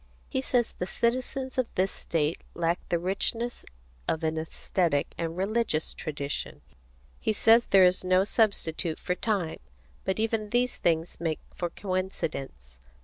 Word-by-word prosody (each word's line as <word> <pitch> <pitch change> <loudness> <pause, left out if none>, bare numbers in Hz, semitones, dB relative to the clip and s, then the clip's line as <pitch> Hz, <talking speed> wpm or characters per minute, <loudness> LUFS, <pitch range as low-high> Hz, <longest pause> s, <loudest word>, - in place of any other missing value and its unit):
He 265 - 0
says 245 -3 +1
the 180 - -4
citizens 255 +4 -1
of 255 - +2
this 190 +1 +2
state 155 -1 -1
lack 170 0 +1
the 170 - +2
richness 200 +7 0 0.4
of 160 0 0
an 160 0 +1
æsthetic 160 -1 0
and 165 0 -3
religious 195 -4 0
tradition. 145 -2 -4 0.6
He - - +1
says 225 +3 +5
there 190 -1 +7
is 180 +1 +3
no 185 +1 +4
substitute 190 -7 +1
for 180 - -1
time. 185 -4 -1 0.4
But 190 - 0
even 220 -1 0
these 245 +2 +1
things 165 0 0
make 160 -2 -1
for 175 - -2
coincidence. 155 - -4
185 Hz, 145 wpm, -28 LUFS, 160-225 Hz, 0.6 s, there